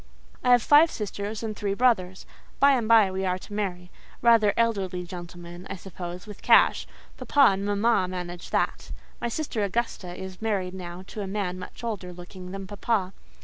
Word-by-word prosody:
I 250 - +2
have 245 -2 +6
five 300 +3 +7
sisters 210 -2 -5
and 215 -1 -3
three 200 -1 -2
brothers. 195 -6 +1 0.3
By 280 0 +6
and 245 -5 +1
by 220 -4 +6
we 190 +1 -3
are 185 -1 0
to 205 - -12
marry—rather 205 +3 +1
elderly 195 -6 0
gentlemen, 175 0 -9
I - - -4
suppose, 180 -1 -8
with 210 -2 -11
cash: - - +5 0.3
papa 280 -6 +4
and 195 +1 -3
mamma 205 -1 +2
manage 180 -1 -6
that. - - -1 0.3
My 240 - 0
sister 235 -5 -2
Augusta 200 -4 -2
is 190 0 -8
married 195 -5 -1
now 180 -1 -7
to 210 - -7
a 195 - -4
man 190 -2 -3
much 185 - -10
older 205 -6 -4
looking 180 +1 -10
than 195 +1 -6
papa. 200 -1 -1
195 Hz, 175 wpm, -26 LUFS, 180-225 Hz, 0.3 s, five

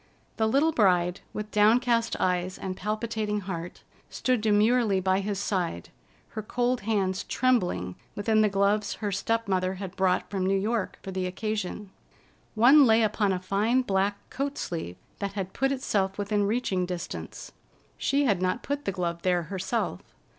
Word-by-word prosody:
The 220 - +2
little 280 +8 +3
bride, 180 - +2
with 210 0 -6
downcast 230 +2 +3
eyes 180 0 0
and 190 -1 -4
palpitating 215 +1 -2
heart, 180 -3 -6 0.3
stood 255 -3 0
demurely 215 0 +3
by 190 +1 +2
his 200 0 -2
side, 180 - -2 0.4
her 215 - -5
cold 245 +3 -1
hands 195 -3 0
trembling 180 - +1 0.2
within 215 +1 +2
the 215 - +4
gloves 200 +1 +1
her 205 -2 -3
step 225 +3 -1
mother 185 -1 0
had 190 -1 -7
brought 185 -1 +1
from 195 -2 -2
New 195 +1 +2
York 215 +1 -1
for 190 - -6
the 185 -1 -2
occasion. 210 0 -4 0.6
One 260 +5 +7
lay 225 0 +5
upon 210 -1 +1
a 185 - 0
fine 210 +7 +1
black 200 -1 0
coat 275 +2 -3
sleeve 160 - -4 0.2
that 200 -1 -3
had 195 -2 -4
put 270 0 +1
itself 195 -8 -1
within 205 0 0
reaching 200 -5 0
distance. 180 -1 -6 0.4
She 280 +1 +1
had 200 -7 +2
not 185 +6 0
put 285 0 -3
the 195 - 0
glove 170 -2 -3
there 180 -1 +1
herself. 190 - -2
200 Hz, 160 wpm, -27 LUFS, 185-225 Hz, 0.6 s, One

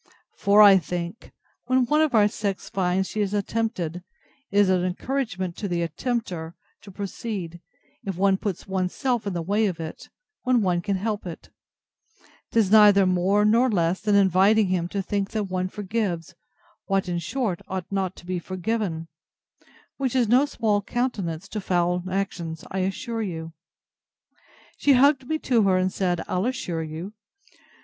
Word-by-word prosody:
For, 205 +1 +5
I 195 -2 +8
think, 175 +5 -6 0.4
when 255 0 +3
one 300 +5 +2
of 305 -6 +2
our 210 -2 +6
sex 205 -2 -4
finds 190 0 0
she 215 - -3
is 205 0 -1
attempted, 205 -5 -2
it 180 - -11 0.5
is 200 0 +4
an 185 -1 +2
encouragement 185 -2 -2
to 205 - -3
the 175 -2 -1
attempter 180 -8 -3 0.3
to 205 - -13
proceed, 195 -3 -5 0.4
if 195 -3 -4
one 195 0 +3
puts 195 -3 -4
one's 185 -1 -2
self 245 -6 -1
in 200 - -2
the 170 -1 -2
way 205 +5 +1
of 175 -4 -4
it, 160 -1 -7 0.3
when 250 -3 +2
one 175 -2 +1
can 200 +1 -1
help 205 0 -3
it: 170 - -9 1.0
'Tis 220 -4 +2
neither 205 -2 +7
more 185 +3 +2
nor 235 +4 +4
less 175 -3 +1
than 210 -2 +2
inviting 195 +2 +4
him 180 -2 0
to 195 +2 -3
think 200 0 -2
that 215 -1 0
one 185 -1 -2
forgives, 190 -4 -3 0.5
what, 195 -1 +1
in 175 -1 -1
short, 190 +2 -2
ought 185 -2 -4
not 190 -2 -1
to - - -14
be 180 0 -2
forgiven: 185 -2 -3 0.9
Which 265 -2 -1
is 245 -3 +3
no 255 +6 +4
small 215 -6 0
countenance 200 -8 -3
to 210 - -4
foul 180 -1 0
actions, 185 -4 -3
I'll 190 -1 0
assure 225 +4 -3
you. 165 -5 -5 1.2
She 285 - +4
hugged 270 0 +4
me 315 - 0
to 240 -3 +3
her, 190 -2 +3
and 185 0 0
said 175 -3 0
I'll 185 +5 0
assure 180 -10 -3
you! 160 +6 -6
195 Hz, 170 wpm, -25 LUFS, 180-220 Hz, 1.2 s, I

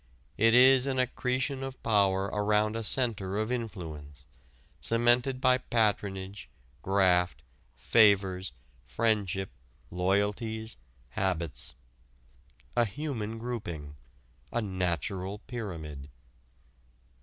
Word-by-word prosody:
It 115 +2 +4
is 130 +1 +6
an 135 -1 -1
accretion 130 +2 0
of 135 0 -7
power 100 -3 +3
around 105 +1 +1
a 115 - -2
center 105 -5 +2
of 110 +2 -1
influence, 80 - -6 0.5
cemented 120 +3 +2
by 130 -1 +4
patronage, 100 -5 -1 0.3
graft, 90 -1 +2 0.3
favors, 100 -4 +3 0.3
friendship, 95 - 0 0.4
loyalties, 105 +5 -1 0.3
habits, 85 -4 -2 1.0
a 120 - +4
human 115 -3 -4
grouping, 85 -12 -5 0.6
a 120 - 0
natural 95 -1 -2
pyramid. 80 - -6
105 Hz, 85 wpm, -29 LUFS, 95-120 Hz, 1.0 s, is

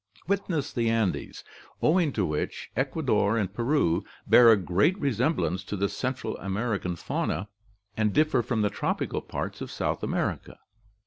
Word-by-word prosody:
Witness 180 -7 -1
the 115 -3 +1
Andes, 115 -4 -1 0.4
owing 165 -1 +3
to 100 - +1
which 75 -2 -3
Ecuador 125 -6 +1
and 100 -4 -1
Peru 115 - +1 0.2
bear 120 -2 +8
a 110 - +6
great 100 - +2
resemblance 120 - 0
to 105 - -4
the 100 +1 +1
Central 130 0 -3
American 100 -2 -2
fauna, 90 +3 -2 0.5
and 105 -1 +1
differ 155 0 +3
from 115 -2 -1
the 105 - +1
tropical - - -2
parts - - -5
of - - -5
South - - -2
America." - - -2
115 Hz, 145 wpm, -27 LUFS, 100-140 Hz, 0.5 s, bear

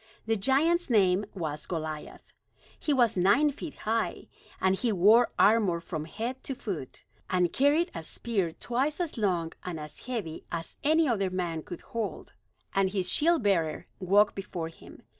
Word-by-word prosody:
The 225 0 +1
giant's 290 - +2
name 200 -3 +3
was 155 -5 -4
Goliath. 155 -3 -6 0.5
He 300 - -1
was 245 -5 +3
nine 205 +12 +4
feet 295 +1 -8
high; 225 +1 -2 0.3
and 190 0 +3
he 235 +4 0
wore 215 +5 +6
armor 205 -5 +4
from 160 -2 -5
head 235 +10 -5
to 270 - -3
foot, 180 - -6 0.3
and 180 -2 +1
carried 295 +6 +3
a 165 - -5
spear 190 +1 -2
twice 260 - -2
as 345 -3 -2
long 180 -7 0
and 175 -3 -5
as 150 +9 -10
heavy 210 -11 -4
as 165 0 -5
any 315 +2 +4
other 200 -6 +1
man 175 -3 -2
could 175 - -8
hold; 230 -3 -5 0.4
and 195 -1 +2
his 185 -2 -1
shield 330 -2 +3
bearer 165 -6 +1
walked 200 +3 +4
before 175 -4 -5
him. 165 - -15
200 Hz, 160 wpm, -29 LUFS, 175-245 Hz, 0.5 s, wore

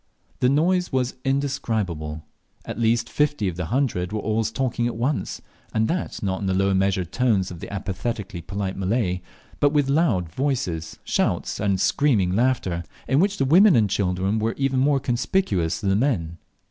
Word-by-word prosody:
The 125 - +3
noise 175 +6 +2
was 130 -1 0
indescribable. 110 - -2 0.4
At - - -6
least 115 0 +2
fifty 145 -6 0
of 90 - -2
the 90 0 -3
hundred 115 -8 0
were 110 - -2
always 110 +1 0
talking 120 -1 -1
at 120 - -3
once, 130 +6 -2 0.3
and 110 0 +2
that 180 -8 -3
not 95 0 -1
in 100 - -2
the 95 - +1
low 95 +1 +2
measured 95 -2 +1
tones 110 -8 +1
of 85 - -8
the - - -8
apathetically 100 -1 -4
polite 95 +1 -4
Malay, 95 -2 0 0.4
but 145 +1 +3
with 145 -2 +2
loud 140 - +2
voices, 85 - -2
shouts, - - 0
and 100 -2 +1
screaming 105 -9 +2
laughter, 110 -8 +1 0.2
in 135 - +3
which 200 +3 +2
the 135 - +1
women 180 +7 +6
and 105 -5 +3
children 95 +2 0
were 110 +1 -1
even 135 -1 +1
more 140 +1 +3
conspicuous 120 - 0
than 100 - 0
the - - +3
men. 95 - 0
110 Hz, 175 wpm, -24 LUFS, 95-135 Hz, 0.4 s, women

